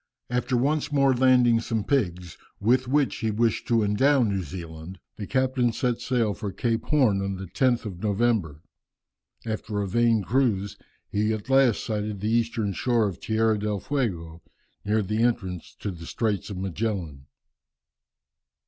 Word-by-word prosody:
After 125 0 0
once 145 +4 0
more 140 -2 +4
landing 125 -2 +4
some 115 -2 -2
pigs, 90 - -1 0.2
with 125 +5 +2
which 140 +1 +1
he 110 - -1
wished 110 +1 0
to 115 -2 +3
endow 130 +7 +3
New 100 -4 0
Zealand, 85 +1 -8 0.2
the 105 - -6
captain 130 -2 +1
set 120 0 -1
sail 120 -4 0
for 100 0 -5
Cape 115 +1 -1
Horn 125 -10 +3
on 100 0 -2
the 95 +1 -6
10th 120 +6 +1
of 95 -4 -7
November. 105 -8 0 0.8
After 110 -1 -3
a 100 - -1
vain 115 +1 +2
cruise, 105 -5 0 0.4
he 105 +1 +1
at 110 +4 -5
last 135 -4 +4
sighted 105 -2 -3
the 105 +3 -1
eastern 115 -3 0
shore 120 0 +1
of 95 -2 -6
Tierra 110 0 +1
del 105 -1 -2
Fuego, 90 - -3 0.4
near 105 +1 +1
the 105 +3 -1
entrance 100 -8 -1
to 100 - -3
the 85 -2 -10
Straits 110 -3 -2
of 100 - -6
Magellan. 95 -7 -3
110 Hz, 155 wpm, -25 LUFS, 100-120 Hz, 0.8 s, more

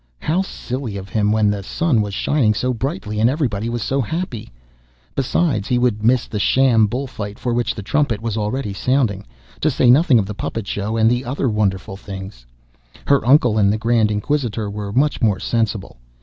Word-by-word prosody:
How 165 - 0
silly 125 - -5
of 95 0 -8
him, 105 +1 +1
when 105 -1 +3
the 100 -1 -3
sun 130 - 0
was 100 -1 -4
shining 115 -7 +1
so 125 +4 0
brightly, 120 - -3
and 115 +2 +4
everybody 120 -7 -1
was 120 -1 -3
so 135 +1 0
happy! 130 - -4 0.6
Besides, 135 - 0
he 125 - +1
would 120 -4 +1
miss 120 +2 +3
the 105 - -4
sham 115 0 +4
bull 125 +6 -3
fight 105 -5 -7
for 120 - -2
which 120 0 0
the 105 - -6
trumpet 120 -1 0
was 115 -1 -3
already 105 0 -2
sounding, 115 - 0 0.3
to 155 - +2
say 125 -3 +4
nothing 140 0 +5
of 105 - +2
the 105 - -5
puppet 105 +2 -4
show 105 +3 -3
and 110 0 +4
the 120 +2 +1
other 135 +2 -2
wonderful 95 -3 -1
things. 95 - -9 0.6
Her 140 -1 +3
uncle 125 -3 +4
and 100 -1 +4
the 105 - 0
Grand 115 -1 +2
Inquisitor 110 -1 -1
were 100 -1 -5
much 140 +6 +1
more 105 -6 +2
sensible. 110 - -2
115 Hz, 195 wpm, -20 LUFS, 105-130 Hz, 0.6 s, nothing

